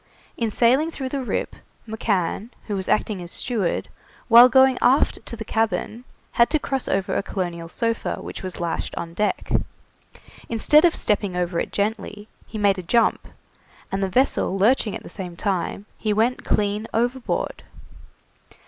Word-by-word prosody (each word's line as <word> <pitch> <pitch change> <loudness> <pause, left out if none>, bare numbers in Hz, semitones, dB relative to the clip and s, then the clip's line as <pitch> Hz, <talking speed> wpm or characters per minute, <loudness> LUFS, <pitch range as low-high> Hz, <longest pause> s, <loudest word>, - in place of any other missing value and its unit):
In 230 -2 -1
sailing 255 +8 +3
through 270 -5 -5
the 275 0 -3
Rip, - - -3 0.3
McCann, 210 -1 -1 0.2
who 210 - -3
was 190 -1 -3
acting 210 -3 0
as 175 0 -8
steward, 215 -8 -2 0.4
while 240 +2 +9
going 265 0 +5
aft 265 +3 +3
to - - -5
the 220 -1 -7
cabin, 225 +2 -1 0.3
had 235 - +4
to 310 - +2
cross 270 -3 -3
over 195 -1 0
a - - +1
colonial 175 -4 -4
sofa 230 +5 -1
which - - -7
was 185 -2 -5
lashed 170 -1 -3
on 165 0 -5
deck. 210 +3 -1 1.0
Instead 300 +8 +5
of 340 - +3
stepping 205 -3 0
over 175 -1 -1
it - - -3
gently, 210 0 -3 0.2
he 220 - -7
made 200 -2 +2
a - - -3
jump, 230 +7 +1 0.6
and 195 - -1
the 195 - 0
vessel 220 -3 +1
lurching 215 +1 +2
at - - -7
the - - -10
same 180 -4 -7
time, 195 +1 -2
he 215 -1 0
went 230 +4 +1
clean 210 +1 0
overboard. 245 +2 -1
215 Hz, 165 wpm, -23 LUFS, 190-240 Hz, 1.0 s, while